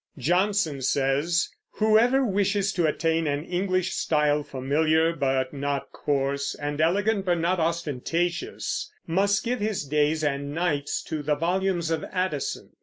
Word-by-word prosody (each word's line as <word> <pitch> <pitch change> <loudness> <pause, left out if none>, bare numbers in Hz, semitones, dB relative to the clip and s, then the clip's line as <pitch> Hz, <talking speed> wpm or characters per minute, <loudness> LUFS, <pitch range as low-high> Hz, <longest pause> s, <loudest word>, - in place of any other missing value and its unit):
Johnson 175 - +1
says, 140 +6 +1 0.3
"Whoever 230 +5 +4
wishes 200 -1 +1
to 175 -3 +2
attain 165 +1 0
an 145 +1 -1
English 185 0 0
style, 150 -1 +1
familiar 155 +4 +1
but 130 -2 0
not 140 -1 -3
coarse, 140 0 -1
and 145 +1 -3
elegant 200 +5 +2
but 175 -2 +1
not 170 +2 +1
ostentatious, 170 - -2
must 200 +5 +1
give 245 +1 -1
his 210 -6 -1
days 150 +2 +1
and 140 0 -2
nights 155 -5 -1
to 155 - -4
the 150 +1 +1
volumes 175 +1 0
of 160 -2 -1
Addison." 185 -6 -3
165 Hz, 135 wpm, -26 LUFS, 145-190 Hz, 0.3 s, Whoever